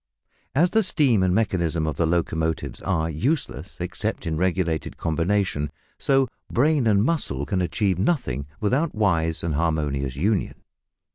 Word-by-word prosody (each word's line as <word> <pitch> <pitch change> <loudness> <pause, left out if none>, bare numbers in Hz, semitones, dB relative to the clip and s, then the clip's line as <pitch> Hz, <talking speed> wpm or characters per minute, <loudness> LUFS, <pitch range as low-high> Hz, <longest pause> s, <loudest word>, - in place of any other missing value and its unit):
As 175 +6 +4
the 220 - +4
steam 140 - +3
and 95 -1 +2
mechanism 85 -7 +1
of 75 -3 -2
the 85 - +2
locomotive 80 -1 -1
are 80 -4 0
useless 125 - -2
except - - -3
in 80 -1 -1
regulated 85 -2 -1
combination, 85 -2 0 0.3
so 135 -1 +3 0.2
brain 140 -1 +3
and 100 -2 +4
muscle 115 - 0
can 95 +2 -1
achieve 90 +2 0
nothing 70 - 0
without 135 +9 0
wise 85 -6 +1
and 85 -2 -1
harmonious 75 -4 -1
union. 100 +8 -1
90 Hz, 140 wpm, -24 LUFS, 80-110 Hz, 0.3 s, As